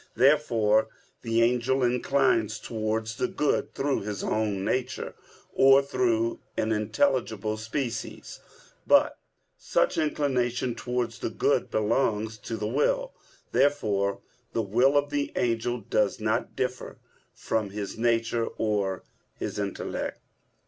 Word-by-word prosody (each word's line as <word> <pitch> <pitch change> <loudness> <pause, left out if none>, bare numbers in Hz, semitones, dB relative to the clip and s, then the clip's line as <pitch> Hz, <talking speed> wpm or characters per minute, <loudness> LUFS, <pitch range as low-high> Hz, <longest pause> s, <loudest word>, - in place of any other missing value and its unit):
Therefore 115 -5 +3 0.3
the 115 0 +2
angel 125 +2 +2
inclines 120 -3 +2
towards 110 0 -3
the - - +1
good 165 -6 -1
through 140 0 0
his 105 0 -4
own 105 -3 -1
nature, 130 0 -2 0.4
or 135 +1 +6
through 115 -4 0 0.2
an 110 - 0
intelligible 110 -1 0
species. 115 +3 -4 0.5
But - - +4 0.4
such - - +1
inclination 130 -5 0
towards 125 -1 -3
the - - -2
good - - +1
belongs 110 -1 0
to 115 +2 -5
the 105 - -3
will. - - 0 0.4
Therefore 110 -8 +1 0.3
the 115 - 0
will 125 +8 +3
of 145 0 +1
the 145 -1 -1
angel 120 0 0
does 105 0 0
not 110 0 -1
differ 125 0 -3 0.4
from 110 -3 -1
his 100 0 -5
nature 115 0 +1
or 100 -4 -1 0.3
his - - -4
intellect. - - -3
115 Hz, 120 wpm, -27 LUFS, 110-130 Hz, 0.5 s, or